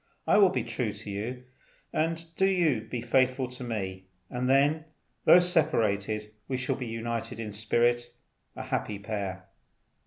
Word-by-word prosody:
I - - +4
will 195 -2 +7
be 185 - -1
true 115 -2 -2
to 105 0 -8
you; 120 +6 -4 0.9
do 190 - +3
you 170 - +2
be 120 -2 -3
faithful 130 0 +2
to 125 0 -8
me; 95 -5 -4 0.3
and 125 +1 -1
then, 145 +4 +3 0.4
though - - +9
separated, 110 - +1
we 130 - -1
shall 130 0 -1
be 125 - -5
united 115 0 -4
in 110 -2 -4
spirit, 120 +3 +1 0.5
a - - -5
happy 105 - -2
pair. 100 -3 -4
120 Hz, 150 wpm, -29 LUFS, 105-130 Hz, 0.9 s, though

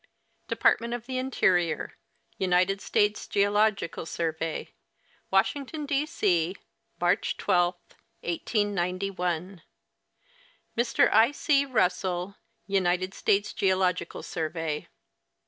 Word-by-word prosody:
Department 235 +1 +2
of 240 -1 -8
the 255 0 -3
Interior, 180 - +1 0.4
United 185 +1 +2
States 210 0 +1
Geological 205 -4 +1
Survey, 160 -1 -3 0.6
Washington, 280 +10 0
D. 285 +1 0
C, 180 - +1 0.4
March 175 +3 +1
12, 175 0 +2 0.5
1891. 180 -2 -2 1.1
Mr. 235 0 +3
I. 225 +5 +6
C. 280 -1 +2
Russell, 185 -4 0 0.3
United 185 -1 +1
States 200 +1 +1
Geological 185 -3 0
Survey. 160 -2 -3
190 Hz, 85 wpm, -27 LUFS, 175-215 Hz, 1.1 s, I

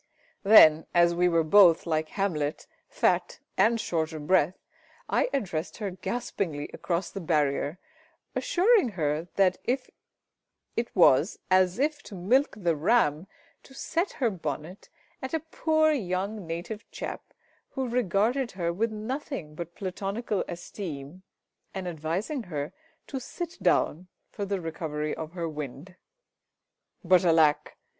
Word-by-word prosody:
Then, 160 -7 +7
as 170 0 +5
we 180 +1 +3
were 165 -1 +3
both, 170 0 +6
like 155 -2 -1
Hamlet, 155 -7 -2 0.2
fat 185 -7 +1 0.2
and 225 +4 +3
short 160 -5 -1
of 155 -2 -6
breath, 180 0 +3 0.5
I - - +1
addressed 175 - -3
her 205 -4 -3
gaspingly 180 -6 -4
across 175 +1 -2
the 195 - -5
barrier, 150 -1 0 0.6
assuring 440 - +3
her 155 +1 -1
that 185 -2 +3
it 255 +1 -2 1.0
was 170 -2 +5
as 185 0 +4
if 290 +2 0
to 205 - -11
milk 235 +11 +2
the 175 -5 +1
ram 160 -1 +2 0.3
to 270 - -17
set 340 +7 -1
her 245 -6 0
bonnet 160 +1 -6 0.3
at 265 +4 -3
a - - +1
poor 315 -1 +3
young 200 - -2
native 175 +7 -6
chap - - -6 0.5
who 265 -2 -3
regarded 235 +2 +1
her 170 -2 -1
with 220 +5 0
nothing 215 - -5
but 170 +2 -7
platonical 195 +3 -3
esteem, 170 -2 -7 0.5
and 190 -1 -4
advising 175 - -3
her 150 -8 -5 0.3
to 270 - -5
sit 340 +6 -7
down 175 +5 +1 0.2
for 205 - -4
the 200 -1 -2
recovery 155 -2 -3
of 160 +1 -7
her 170 -2 -3
wind. 150 +3 -7 1.1
But 185 +1 +5
alack! 160 -4 +3
185 Hz, 135 wpm, -27 LUFS, 160-220 Hz, 1.1 s, Then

